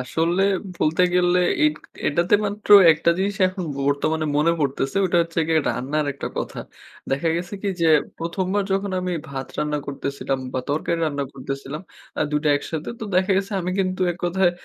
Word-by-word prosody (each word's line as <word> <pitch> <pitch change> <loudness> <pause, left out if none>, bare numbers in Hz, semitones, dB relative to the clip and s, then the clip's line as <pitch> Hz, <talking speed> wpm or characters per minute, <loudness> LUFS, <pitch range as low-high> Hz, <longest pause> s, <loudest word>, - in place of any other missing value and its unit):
আসলে 165 +8 0 0.3
বলতে 160 +3 +2
গেলে 180 0 +3 0.3
এট 150 0 +3 0.3
এটাতে 170 +6 +2
মাত্র 210 +1 -5 0.2
একটা 160 +2 +1
জিনিস 195 +1 -1
এখন 185 0 -4
ব - - -9
বর্তমানে 155 +2 0
মনে 155 +3 +3
পড়তেছে। 135 0 -1
ওটা 180 - 0
হচ্ছে 165 0 -2
গিয়ে 160 -1 +3
রান্নার 145 +4 -1
একটা 140 - -5
কথা। - - -4 0.5
দেখা 140 +5 0
গেছে 175 +3 -4
কি 205 - -1
যে, 165 - +3 0.3
১ম 170 +3 -2
বার 205 -1 +1
যখন 195 +1 0
আমি 180 0 -2 0.2
ভাত 135 -1 -5
রান্না 150 0 0
করতেছিলাম 140 -1 -3
বা 130 - -1
তরকারি 160 +3 -1
রান্না 145 -2 -2
করতেছিলাম 135 +3 -6 0.4
আ - - +3
২ 150 - +1
টা - - +3
একসাথে 155 +2 -5
তো - - -3
দেখা 190 +2 +3
গেছে 195 +2 -1
আমি 180 - -2
কিন্তু 185 -1 -1
এককথায় 175 +1 +1
165 Hz, 180 wpm, -23 LUFS, 145-185 Hz, 0.5 s, গেলে